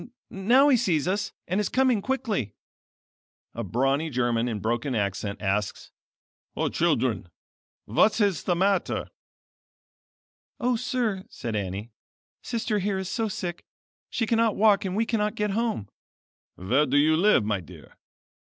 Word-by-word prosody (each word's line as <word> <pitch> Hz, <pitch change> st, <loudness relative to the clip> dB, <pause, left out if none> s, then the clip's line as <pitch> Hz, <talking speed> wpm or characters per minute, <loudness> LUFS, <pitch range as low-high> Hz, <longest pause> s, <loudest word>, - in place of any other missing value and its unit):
Now 245 Hz, +9 st, +4 dB
he 265 Hz, -, +5 dB
sees 175 Hz, -9 st, +1 dB
us, 205 Hz, +2 st, -1 dB, 0.2 s
and 185 Hz, +4 st, 0 dB
is 205 Hz, -, -1 dB
coming 255 Hz, -5 st, +2 dB
quickly." 230 Hz, -, -2 dB, 1.0 s
A 115 Hz, -, -4 dB
brawny 135 Hz, -, 0 dB
German 120 Hz, -3 st, 0 dB
in 115 Hz, -3 st, -2 dB
broken 120 Hz, +5 st, -1 dB
accent 100 Hz, 0 st, -2 dB
asks: 100 Hz, 0 st, -2 dB, 0.6 s
"O -, -, 0 dB
children, 90 Hz, -, 0 dB, 0.6 s
what 215 Hz, -, +3 dB
is 200 Hz, -6 st, +1 dB
the 175 Hz, -, +2 dB
matter?" 190 Hz, +1 st, 0 dB, 1.5 s
"O 250 Hz, 0 st, +1 dB
sir," 225 Hz, -5 st, -1 dB
said 115 Hz, -, -5 dB
Annie, 100 Hz, +3 st, -4 dB, 0.5 s
Sister 225 Hz, -3 st, -1 dB
here 195 Hz, 0 st, -1 dB
is 190 Hz, -1 st, -4 dB
so 225 Hz, +4 st, -1 dB
sick 175 Hz, -4 st, -5 dB, 0.5 s
she 225 Hz, -, -1 dB
cannot 225 Hz, -1 st, +2 dB
walk 205 Hz, -1 st, +4 dB
and 185 Hz, 0 st, -2 dB
we 225 Hz, +2 st, +1 dB
cannot 215 Hz, -2 st, 0 dB
get 210 Hz, -2 st, -1 dB
home." 220 Hz, -, -1 dB, 0.7 s
"Where 130 Hz, +12 st, +1 dB
do 135 Hz, +2 st, +2 dB
you 155 Hz, +2 st, +4 dB
live 175 Hz, -, +4 dB
my 105 Hz, -2 st, 0 dB
dear?" 85 Hz, -, -14 dB
185 Hz, 145 wpm, -26 LUFS, -, 1.5 s, he